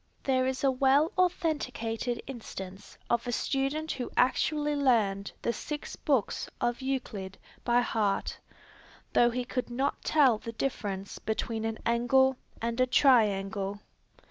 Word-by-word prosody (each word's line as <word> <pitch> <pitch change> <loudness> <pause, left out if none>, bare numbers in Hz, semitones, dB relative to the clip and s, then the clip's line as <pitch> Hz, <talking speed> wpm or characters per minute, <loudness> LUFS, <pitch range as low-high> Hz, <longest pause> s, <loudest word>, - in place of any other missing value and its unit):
There 260 -1 +2
is 260 +1 -2
a 270 - +4
well 275 +4 +3
authenticated 255 -10 -1
instance 195 -6 -8
of 235 +1 0
a - - 0
student 275 +5 -1
who 250 -2 -4
actually 295 +3 +2
learned 215 -8 +2
the 235 - +1
six 300 +3 -5
books 270 -8 0
of 240 +2 -1
Euclid 235 -8 -3 0.3
by 240 0 +3
heart, 215 -4 -1 0.7
though 240 - +5
he 245 +1 -2
could 250 0 -3
not 265 +4 -1
tell 265 -8 +4
the 230 - -7
difference 205 -5 -3
between 220 0 -2
an 225 0 -2
angle 250 +3 +3 0.3
and 235 +2 0
a 255 - +4
triangle. 205 -6 +3
245 Hz, 135 wpm, -29 LUFS, 220-270 Hz, 0.7 s, though